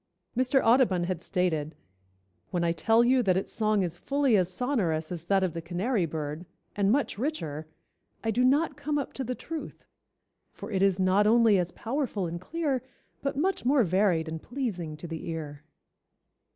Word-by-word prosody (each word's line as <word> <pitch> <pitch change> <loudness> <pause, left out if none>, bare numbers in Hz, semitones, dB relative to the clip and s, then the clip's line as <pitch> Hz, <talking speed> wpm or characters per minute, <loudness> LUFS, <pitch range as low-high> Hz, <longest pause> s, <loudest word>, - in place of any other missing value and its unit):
Mr. 255 +2 +3
Audubon 225 -7 +4
had 175 -1 -2
stated: 160 -6 -1 0.7
"When 175 -1 -1
I 170 - +2
tell 225 +7 +3
you 255 +1 +4
that 190 -5 +2
its 190 - -3
song 215 -2 +2
is 175 -1 -3
fully 280 -4 +2
as 185 -2 +2
sonorous 180 - -1
as 170 -2 -5
that 195 +1 +2
of 180 -4 0
the 165 - -4
canary 180 +4 -1
bird, 155 +2 -5 0.3
and 200 0 +2
much 270 -5 0
richer, 160 - -3 0.6
I 225 - +1
do 245 +3 +1
not 285 +4 +3
come 290 +1 -2
up 280 - -3
to 270 - -4
the 250 0 -3
truth, 320 +3 -7 0.7
for - - -8
it 190 -2 0
is 195 -1 +3
not 190 +3 +3
only 225 -3 +5
as 175 0 -1
powerful 235 -5 -2
and 170 +1 -5
clear, 290 - -1 0.4
but 275 -1 -2
much 380 +6 0
more 265 +1 +4
varied 185 -3 +2
and 160 0 -5
pleasing 195 - -4
to 170 - -8
the 165 0 -6
ear." 150 -3 -5
195 Hz, 180 wpm, -28 LUFS, 170-255 Hz, 0.7 s, only